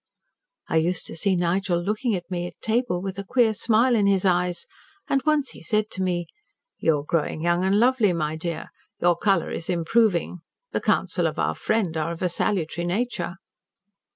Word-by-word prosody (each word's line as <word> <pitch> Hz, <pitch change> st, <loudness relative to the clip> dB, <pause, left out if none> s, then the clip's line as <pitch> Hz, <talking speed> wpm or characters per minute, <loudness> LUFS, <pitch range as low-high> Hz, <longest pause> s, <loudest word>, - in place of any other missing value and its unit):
I -, -, +1 dB
used 170 Hz, +2 st, 0 dB
to -, -, -8 dB
see 190 Hz, +3 st, +1 dB
Nigel 175 Hz, +1 st, +1 dB
looking 215 Hz, +5 st, -1 dB
at 175 Hz, -, -4 dB
me 175 Hz, -1 st, -2 dB
at -, -, -13 dB
table 225 Hz, -5 st, 0 dB
with 195 Hz, 0 st, -4 dB
a -, -, -3 dB
queer 225 Hz, +2 st, +3 dB
smile 230 Hz, +4 st, +3 dB
in 205 Hz, -3 st, +3 dB
his 195 Hz, -1 st, +2 dB
eyes 180 Hz, -1 st, +1 dB, 0.4 s
and 275 Hz, -, +2 dB
once 300 Hz, -3 st, +2 dB
he -, -, -12 dB
said 215 Hz, +5 st, 0 dB
to 190 Hz, -, -4 dB
me 175 Hz, -2 st, 0 dB, 0.5 s
'You 155 Hz, -3 st, +2 dB
are -, -, -12 dB
growing 155 Hz, 0 st, -1 dB
young 175 Hz, +1 st, +2 dB
and 195 Hz, +2 st, +3 dB
lovely, 240 Hz, -4 st, +4 dB
my 155 Hz, -2 st, -1 dB
dear. 165 Hz, 0 st, -5 dB, 0.3 s
Your 175 Hz, 0 st, +3 dB
colour 195 Hz, -1 st, +1 dB
is 165 Hz, -, -5 dB
improving. 180 Hz, 0 st, +1 dB, 0.3 s
The -, -, -1 dB
counsels -, -, +1 dB
of -, -, -4 dB
our -, -, +1 dB
friend 210 Hz, -7 st, -1 dB
are 160 Hz, +1 st, -1 dB
of 170 Hz, +2 st, -5 dB
a 180 Hz, -, +2 dB
salutary 170 Hz, -1 st, -1 dB
nature.' 185 Hz, -3 st, -2 dB
180 Hz, 190 wpm, -24 LUFS, 170-215 Hz, 0.5 s, lovely